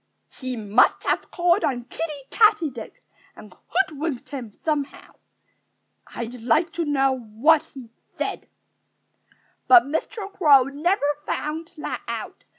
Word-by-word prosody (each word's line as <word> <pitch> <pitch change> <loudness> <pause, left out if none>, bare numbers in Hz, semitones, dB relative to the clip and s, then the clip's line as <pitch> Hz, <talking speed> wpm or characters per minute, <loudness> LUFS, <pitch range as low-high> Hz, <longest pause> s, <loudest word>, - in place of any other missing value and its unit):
"He 255 -1 -5
must 215 +1 +3
have - - -1
called 350 +2 +2
on 245 -3 -1
Kiddie 290 +1 -6
Katydid 425 - +2 0.4
and 210 -3 -13
hoodwinked 315 -7 -2
him 245 -7 -8
somehow.... 290 -3 -3 0.9
I'd 235 +1 -7
like 315 +8 +2
to 340 - -2
know 270 -2 +2
what 245 +8 +3
he 245 -4 -10 0.3
said." - - -4 1.2
But 365 -2 +8
Mr. 390 - -4
Crow 290 -9 +6
never 290 +6 0 0.2
found 320 +3 -4
that 300 - -5
out. - - -6
290 Hz, 120 wpm, -23 LUFS, 250-330 Hz, 1.2 s, But